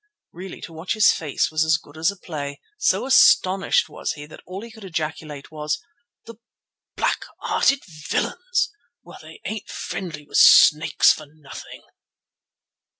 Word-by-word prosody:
Really 185 +2 -9
to 165 - -9
watch 160 +7 -3
his 215 -2 +6
face 155 -2 -1
was 155 0 +2
as 160 0 +3
good 145 -2 -18
as 160 +2 +1
a 200 - -6
play. 145 -5 -6 0.2
So - - +1
astonished 195 -7 +4
was - - -4
he 145 - -9
that 150 - -14
all 190 +3 -7
he 230 - -10
could 220 -1 -14
ejaculate 155 -5 -5
was— 150 -1 -2 0.5
"The 230 -2 -11 0.6
black - - 0 0.2
hearted 275 0 +1 0.3
villains! - - -1 0.3
Well, - - -13
they - - -14
ain't 215 -2 -5
friendly 155 -6 -6
with - - -3
snakes 155 +1 +6
for 155 - -10
nothing." 150 -2 -12
160 Hz, 150 wpm, -22 LUFS, 155-195 Hz, 0.6 s, his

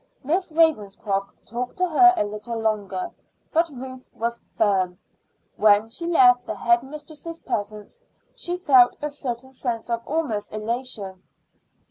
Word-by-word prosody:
Miss 345 +6 0
Ravenscroft 210 -11 +1 0.2
talked 245 +2 -5
to 365 - +2
her 360 +2 +7
a - - +3
little 210 +3 -5
longer, 205 -4 -1 0.4
but 330 +1 +3
Ruth 260 -1 -8
was 235 +1 -2
firm. 190 -4 +2 0.6
When 210 +1 +5
she 335 +9 -4
left 250 -7 +5
the - - -3
head 235 +4 +3
mistress's 305 +4 -9
presence 210 - -5 0.3
she 355 +1 -3
felt 260 -8 +5
a 300 - -1
certain 265 -2 -5
sense 240 -3 -3
almost 235 -2 -2
of 215 0 -5
elation. 220 -5 -4
240 Hz, 135 wpm, -24 LUFS, 210-295 Hz, 0.6 s, her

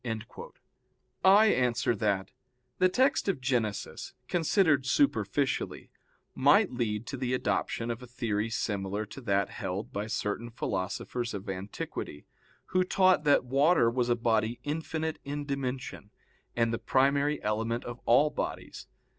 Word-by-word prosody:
I 200 +3 +7
answer 125 - +1
that, 100 -3 -1 0.5
The 185 0 +5
text 260 +6 +2
of 195 -8 0
Genesis, 120 -6 -2
considered 160 -5 +2
superficially, 130 -1 0 0.4
might - - +4
lead 115 -3 -2
to 135 - -5
the 130 0 -1
adoption 120 -2 -1
of 120 +2 -6
a 125 - -10
theory 115 -3 -2
similar 100 -1 -2
to 105 +6 -10
that 100 -4 +1
held 95 +3 -5
by 105 +2 -3
certain 110 0 -3
philosophers 115 +2 -3
of 100 +1 -7
antiquity, 95 -5 -6 0.4
who 185 0 +1
taught 185 -3 +3
that 145 -3 +4
water 135 -1 +3
was 125 0 0
a 120 - +4
body 115 0 0
infinite 160 +1 -3
in 145 +1 -4
dimension, 130 -6 -4 0.5
and 115 -1 +1
the 115 - -2
primary 140 +2 +2
element 115 +3 -1
of 120 0 -7
all 145 +6 +5
bodies. - - -5
120 Hz, 135 wpm, -29 LUFS, 110-145 Hz, 0.5 s, I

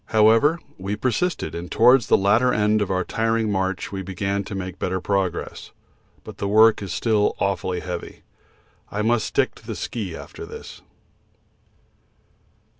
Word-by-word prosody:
However, 115 +10 +4 0.2
we 100 +2 -3
persisted, 130 - -1
and 85 +1 -6
towards 120 +1 +5
the - - +5
latter 110 +6 +3
end 105 -1 +2
of 100 - -1
our 95 -1 0
tiring 115 +2 0
march 95 -1 -2
we 95 -1 -4
began 95 +2 -2
to 105 - -6
make 95 -1 -6
better 95 0 -1
progress, 95 -1 -2 0.5
but - - -11
the 100 - -1
work 110 +2 +5
is 100 -3 -5
still 105 +1 +1
awfully 95 -2 -1
heavy. 90 -1 -7 0.7
I 105 +1 -2
must 115 0 +1
stick - - +1
to - - -18
the - - -4
ski 100 -8 -4
after - - -9
this. - - -10
100 Hz, 155 wpm, -23 LUFS, 95-110 Hz, 0.7 s, towards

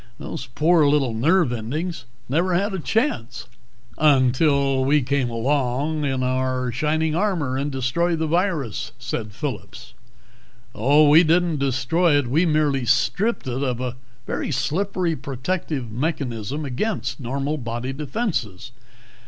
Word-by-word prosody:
Those 135 - -6
poor 155 +4 +3
little 140 -4 +2
nerve 150 +4 +2
endings 130 +6 -4 0.2
never 175 +7 +1
had 200 +3 0
a 190 - -2
chance!" 220 - -1 0.5
"Until 140 -1 +3
we 145 +1 +3
came 135 -1 0
along 140 +5 0
in 130 -2 -1
our 130 0 0
shining 155 +5 0
armor 170 -8 0
and 140 +2 -2
destroyed 150 +6 0
the 160 - -1
virus," 165 - -1
said 120 -3 -4
Phillip. - - -5 1.0
"Oh, 145 +8 +4
we 155 +4 +7
didn't 170 -1 +2
destroy 140 +5 +2
it. 145 - +1
We 155 +9 +2
merely 150 -4 +1
stripped 135 - +1
it 130 +1 -3
of 125 -3 -1
a 125 -1 -3 0.3
very - - -3
slippery 165 +5 -1
protective 135 -1 -3
mechanism 140 0 -3
against 165 - -2
normal 140 +4 -2
body 120 +2 -4
defences." 135 - -3
140 Hz, 130 wpm, -22 LUFS, 125-160 Hz, 1.0 s, we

